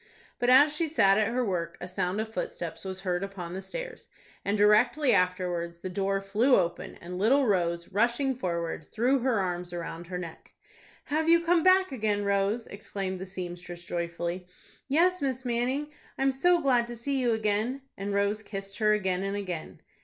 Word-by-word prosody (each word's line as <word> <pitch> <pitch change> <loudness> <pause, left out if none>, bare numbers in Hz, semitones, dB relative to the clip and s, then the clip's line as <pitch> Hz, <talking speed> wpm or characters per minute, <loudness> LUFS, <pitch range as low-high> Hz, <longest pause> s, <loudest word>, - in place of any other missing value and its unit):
But, 245 - +2
as 290 +4 +6
she 330 +1 0
sat 195 -10 +4
at 215 - +2
her 245 +2 0
work, 170 -4 -2
a 180 - -6
sound 185 +1 -2
of 220 0 -4
footsteps 170 -7 -5
was 190 0 -5
heard 180 -2 -1
upon 185 -3 -6
the 190 - -4
stairs, - - -7 0.4
and 200 +2 0
directly 240 +7 +4
afterwards 180 -2 0
the 185 - -5
door 195 +1 0
flew 215 +7 +3
open, 175 -2 -1
and 180 +1 -7
little 265 +7 +4
Rose, 170 -5 0
rushing 240 +7 +1
forward, 170 -7 -3
threw 250 +5 +2
her 245 -3 +1
arms 180 -2 -2
around 170 0 -6
her 180 0 -4
neck. 170 -3 -9 0.5
"Have 315 +2 0
you 335 0 +5
come 340 0 +4
back 370 0 +5
again, 210 -5 0
Rose?" 200 +3 +1
exclaimed 195 -2 -5
the 190 - -6
seamstress, 175 -2 -7
joyfully. 170 +1 -4 0.4
"Yes, 345 +6 +3
Miss 260 -2 -2
Manning, 255 +5 -1 0.3
I'm 270 0 +2
so 350 +7 +3
glad 250 -5 +3
to 240 - -6
see 270 +4 -2
you 240 -2 +2
again;" 220 +5 -1
and 200 +1 -4
Rose 200 +1 +1
kissed 195 -1 -7
her 210 -1 +4
again 190 -3 0
and 195 +1 -2
again. 180 -5 -6
205 Hz, 185 wpm, -28 LUFS, 180-255 Hz, 0.5 s, as